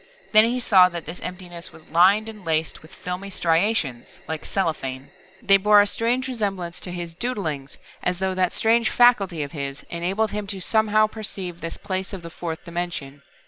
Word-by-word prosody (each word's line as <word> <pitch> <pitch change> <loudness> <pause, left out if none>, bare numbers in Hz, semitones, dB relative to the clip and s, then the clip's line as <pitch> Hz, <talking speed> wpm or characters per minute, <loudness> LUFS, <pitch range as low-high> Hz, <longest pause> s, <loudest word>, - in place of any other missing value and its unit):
Then 215 0 +7
he 245 +2 0
saw 190 -6 +6
that 170 -3 -6
this 165 +4 -6
emptiness 175 -1 -6
was 160 - -16
lined 190 +7 +5
and 215 -3 -8
laced 160 -1 -1
with 155 - -16
filmy 185 +1 -6
striations, 170 - 0
like 160 -1 -4
cellophane. 135 -8 -2 0.3
They 195 -1 +6
bore 210 +1 +6
a 205 - +6
strange 240 +5 0
resemblance 195 -8 -3
to 180 - -5
his 175 -1 -5
"doodlings," 165 - -3 0.2
as 180 0 0
though 190 +1 -1
that 185 -1 +1
strange 230 0 +3
faculty 200 -10 +4
of 140 - -7
his 140 -2 -5
enabled 190 +6 -1
him 210 -1 -4
to 195 -1 -4
somehow 215 +2 +3
perceive 195 -5 -6
this 165 +1 -5
place 190 0 -4
of 185 -3 -6
the 170 - -8
fourth 165 -1 -6
dimension. 170 -5 -5
180 Hz, 185 wpm, -23 LUFS, 165-210 Hz, 0.3 s, Then